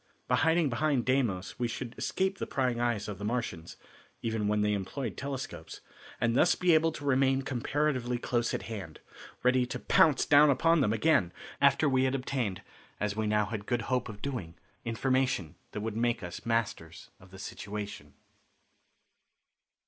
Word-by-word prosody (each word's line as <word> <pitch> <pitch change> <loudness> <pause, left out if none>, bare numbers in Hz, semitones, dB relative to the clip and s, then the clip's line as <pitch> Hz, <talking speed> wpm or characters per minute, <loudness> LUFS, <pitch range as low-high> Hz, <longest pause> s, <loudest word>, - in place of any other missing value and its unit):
By - - +3
hiding 160 +1 +3
behind 130 0 +1
Deimos 120 -7 0
we 120 - +1
should 115 +1 -5
escape 190 +1 -1
the - - -3
prying 125 -3 0
eyes 120 -4 0
of 100 -3 -6
the - - -6
Martians, 105 -7 -3 0.5
even 110 -2 -1
when 105 0 +1
they 105 0 +2
employed 105 +4 -3
telescopes, 135 -1 -6 0.4
and 115 0 +1
thus 175 - +4
be 180 -2 +3
able 160 +1 +4
to 145 - -8
remain 135 0 +3
comparatively 130 -1 -1
close 120 -1 0
at - - -4
hand, 100 -8 -7 0.4
ready 125 0 +3
to - - -4
pounce 155 -4 +4
down 150 0 +7
upon 165 +4 +4
them 105 - +2
again 110 - +3 0.3
after 140 +2 +4
we 130 -1 +3
had 130 +1 +1
obtained, 125 -7 -2 0.4
as 105 -1 -1
we 110 0 -1
now 105 0 +2
had 105 -1 -5
good 120 -2 0
hope 125 -2 0
of 105 -2 -10
doing, 115 -13 -4 0.3
information 120 - 0 0.2
that 105 - -5
would 110 0 -3
make 120 -1 0
us 90 +5 -7
masters 105 -8 -2
of 90 - -17
the 95 - -12
situation. 100 -6 -7
120 Hz, 170 wpm, -30 LUFS, 105-135 Hz, 0.5 s, down